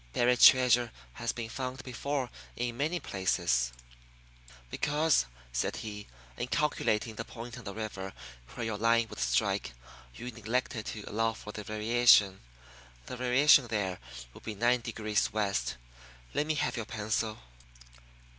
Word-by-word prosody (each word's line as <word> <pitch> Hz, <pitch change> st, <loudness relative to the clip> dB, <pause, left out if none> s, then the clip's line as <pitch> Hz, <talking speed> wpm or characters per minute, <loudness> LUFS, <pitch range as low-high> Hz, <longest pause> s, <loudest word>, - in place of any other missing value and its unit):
"Buried 125 Hz, 0 st, +3 dB
treasure 125 Hz, -2 st, +7 dB, 0.2 s
has 120 Hz, -, -2 dB
been 115 Hz, -2 st, -5 dB
found 130 Hz, +2 st, -5 dB
before 130 Hz, +1 st, -3 dB, 0.2 s
in 120 Hz, -1 st, -2 dB
many 155 Hz, +7 st, -1 dB
places." 65 Hz, -, 0 dB, 1.0 s
"Because," 150 Hz, -, +2 dB, 0.3 s
said -, -, -1 dB
he, 105 Hz, -2 st, -7 dB, 0.3 s
"in -, -, -3 dB
calculating 125 Hz, -6 st, 0 dB
the 115 Hz, -, -5 dB
point 120 Hz, 0 st, -9 dB
on 120 Hz, -4 st, -10 dB
the 100 Hz, -, -5 dB
river 100 Hz, -3 st, -5 dB, 0.4 s
where 120 Hz, -, -3 dB
your 110 Hz, -2 st, -3 dB
line 115 Hz, 0 st, +3 dB
would -, -, -9 dB
strike -, -, +1 dB, 0.4 s
you 125 Hz, +1 st, -6 dB
neglected 115 Hz, +1 st, -2 dB
to 105 Hz, -, -5 dB
allow 115 Hz, +1 st, 0 dB
for 105 Hz, -1 st, -9 dB
the 105 Hz, -, -7 dB
variation. 110 Hz, -2 st, +4 dB, 0.6 s
The -, -, -6 dB
variation 125 Hz, +2 st, +5 dB
there 100 Hz, -5 st, -2 dB, 0.3 s
would -, -, -13 dB
be 110 Hz, -, -6 dB
nine 120 Hz, +3 st, +2 dB
degrees 110 Hz, -2 st, -1 dB
west. 100 Hz, -, -1 dB, 0.6 s
Let 150 Hz, -, 0 dB
me 155 Hz, -, +1 dB
have 140 Hz, -, -1 dB
your 115 Hz, -, -3 dB
pencil." 110 Hz, 0 st, -2 dB
115 Hz, 145 wpm, -30 LUFS, 105-125 Hz, 1.0 s, treasure